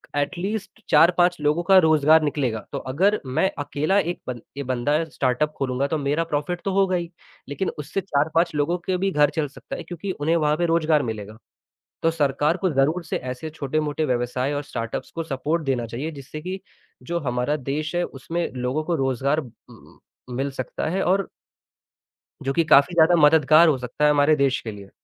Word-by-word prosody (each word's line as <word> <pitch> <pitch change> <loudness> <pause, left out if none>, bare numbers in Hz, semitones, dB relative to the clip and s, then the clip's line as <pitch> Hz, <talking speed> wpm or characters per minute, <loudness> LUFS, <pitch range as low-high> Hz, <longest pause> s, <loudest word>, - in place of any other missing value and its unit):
At least 190 +8 -3
4-5 175 +3 +5
लोगों 150 +4 +1
का 195 +1 +5
रोज़गार 155 0 +5
निकलेगा, 135 -6 -1
तो - - -3
अगर 190 +11 +1
मैं 135 +9 +1
अकेला 145 +6 0
एक 175 -2 -2
बन 125 -2 -5 0.2
ए 140 - -3
बंदा 135 +5 0
स्टार्टअप 145 0 0
खोलूँगा 135 +1 -1
तो 160 - -1
मेरा 145 +3 0
प्रॉफिट 165 +3 -3
तो 195 - 0
होगा 195 -1 +2
ही, 170 -1 -3 0.4
लेकिन 185 +7 -2
उससे 150 +6 -3
4-5 165 0 +1
लोगों 150 +4 +1
के 185 -1 0
भी 195 +1 0
घर 150 -2 +4
चल 155 -3 0
सकता 140 - -9
है - - -6
क्योंकि 180 +3 -5
उन्हें 160 0 0
वहाँ 150 -2 +2
पे 175 - +1
रोज़गार 160 -2 +2
मिलेगा। 110 -2 -6 0.7
तो 165 - +3
सरकार 150 +1 +1
को 190 0 0
ज़रूर 150 +6 +1
से - - -3
ऐसे 130 +5 -6
छोटे-मोटे 150 +1 -2
व्यवसाय 125 +2 -1
और 145 - -2
स्टार्टअप्स 115 -4 -5
को 165 - -2
सपोर्ट 155 +3 -2
देना 125 -4 -1
चाहिए, 130 +8 -5
जिससे 150 0 -9
कि 185 +2 -5 0.4
जो 170 0 -2
हमारा 125 +1 -1
देश 150 +4 -4
है 175 - +1
उसमें 165 +6 -4
लोगों 130 +4 -2
को 170 - -1
रोज़गार 135 +1 0
उम 130 -6 -11 0.2
उम, - - -17 0.4
मिल 140 +1 -1
सकता 130 -2 -4
है 190 +3 0
और 195 +2 +1 1.2
जो 135 - -1
कि 165 - +2
काफ़ी 155 +3 +5
ज़्यादा 170 +1 +5
मददगार 155 +2 +6
हो 150 - +3
सकता 125 +3 -4
है - - +6
हमारे 145 +1 +4
देश 140 -2 +1
के 110 - -6
लिए। 100 -2 -11
150 Hz, 190 wpm, -23 LUFS, 135-170 Hz, 1.2 s, मददगार